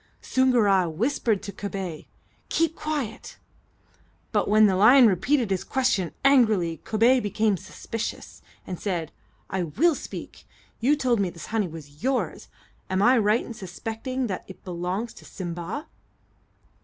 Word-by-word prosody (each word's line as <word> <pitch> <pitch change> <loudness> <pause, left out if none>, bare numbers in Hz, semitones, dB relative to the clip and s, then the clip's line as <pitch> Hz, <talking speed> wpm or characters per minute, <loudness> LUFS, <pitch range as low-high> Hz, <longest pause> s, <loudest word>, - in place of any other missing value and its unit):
Soongoora 215 -9 +3
whispered 220 - 0
to 200 - -5
Kobay, 190 -5 -5 0.4
"Keep 330 0 +1
quiet;" 290 -8 -4 0.9
but - - +1
when 215 +1 +6
the 195 -2 +3
lion 245 +7 +7
repeated 230 - +2
his 190 - 0
question 235 -10 0
angrily, 215 -12 +4
Kobay 230 +4 +4
became 210 -1 +1
suspicious, 220 +4 -6 0.2
and 180 -2 -6
said: 175 -6 -2 0.4
"I 190 - -2
will 250 - +2
speak. - - -8 0.3
You 270 +6 +3
told 255 -6 +1
me 195 -2 +1
this 170 -1 -9
honey 215 -4 +1
was 150 -3 -11
yours; 260 +2 -1 0.4
am 190 +1 +1
I 250 +4 +6
right 215 +2 +2
in 235 - -7
suspecting 225 +6 -4
that 190 -6 -4
it 190 - -12
belongs 180 +5 -3
to - - -14
Simba?" 175 - -5
210 Hz, 140 wpm, -25 LUFS, 185-250 Hz, 0.9 s, lion